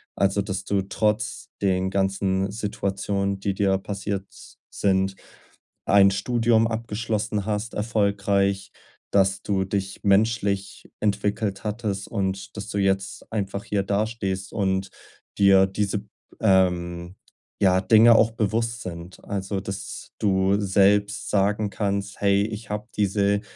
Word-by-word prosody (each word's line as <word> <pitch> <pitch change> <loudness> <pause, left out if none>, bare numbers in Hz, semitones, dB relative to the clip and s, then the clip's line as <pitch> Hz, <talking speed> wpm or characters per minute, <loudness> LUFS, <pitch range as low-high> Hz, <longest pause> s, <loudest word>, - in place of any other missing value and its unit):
Also, 100 +1 +2
dass 95 -1 -4
du 100 -1 +1
trotz 105 +2 -1
den 95 -1 +1
ganzen 95 0 0
Situationen, 100 -1 -2
die 100 0 -1
dir 95 -1 +2
passiert 100 0 -4 0.5
sind, 95 -1 +1 0.7
ein 100 0 +6
Studium 115 +2 +2
abgeschlossen 110 -2 -2
hast, 110 +1 -2
erfolgreich, 100 -2 0 0.4
dass 95 -1 +3
du 95 -2 0
dich 95 0 -3
menschlich 100 -1 +1
entwickelt 105 -1 -1
hattest 105 -2 -3
und 95 -2 -3
dass 105 +1 -6
du 100 - -3
jetzt 95 0 -1
einfach 100 -2 -3
hier 100 -2 0
dastehst 100 -2 -2
und 95 -1 0 0.5
dir 95 -1 +6
diese, 100 +1 -1
b 105 - -15 0.4
ähm, 90 -3 +1 0.5
ja 95 -1 +4
Dinge 115 +3 +7
auch 115 0 +4
bewusst 115 +1 -1
sind. 85 0 -8
Also, 100 -1 -3
dass 100 0 -7
du 95 0 +2
selbst 100 +1 +2
sagen 105 +1 +1
kannst: 100 -1 -2
„Hey, 100 0 +3
ich 110 0 -7
habe 105 0 -4
diese 100 0 +2
100 Hz, 125 wpm, -24 LUFS, 95-105 Hz, 0.7 s, Dinge